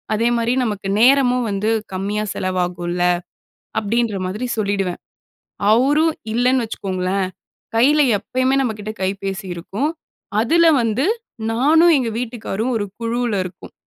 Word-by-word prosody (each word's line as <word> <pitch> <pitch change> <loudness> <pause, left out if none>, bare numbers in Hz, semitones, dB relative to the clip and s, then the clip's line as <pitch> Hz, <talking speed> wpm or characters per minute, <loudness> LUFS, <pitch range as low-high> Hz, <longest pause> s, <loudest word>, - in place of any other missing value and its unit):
அதேமாரி 235 +1 +1
நமக்கு 200 -3 -3
நேரமும் 250 -1 +4
வந்து 200 +2 -1 0.3
கம்மியாக 210 +2 -2
செலவாகும்ல!" 180 -1 -2 0.8
அப்பிடின்ற 220 -1 0
மாதிரி 215 +7 -3
சொல்லிவிடுவேன். 195 -3 -1 0.7
அவரும் 290 +7 +3 0.2
இல்லேன்னு 250 +1 +2
வச்சுக்கோங்களேன், 190 -3 -2 0.5
கையில 290 +6 +4 0.2
எப்பயுமே 255 +5 0
நம்மக்கிட்ட 215 -3 -3
கைபேசி 195 +1 -3
இருக்கும். 200 - -2 0.5
அதில 335 +9 +4 0.2
வந்து 230 +5 0 0.5
நானும் 320 +8 +5
எங்க 255 -3 0
வீட்டுக்காரரும் 235 -1 -3
ஒரு 205 - -1
குழுல 235 -1 -1
இருக்கோம். 180 0 -10
225 Hz, 110 wpm, -20 LUFS, 195-250 Hz, 0.8 s, நானும்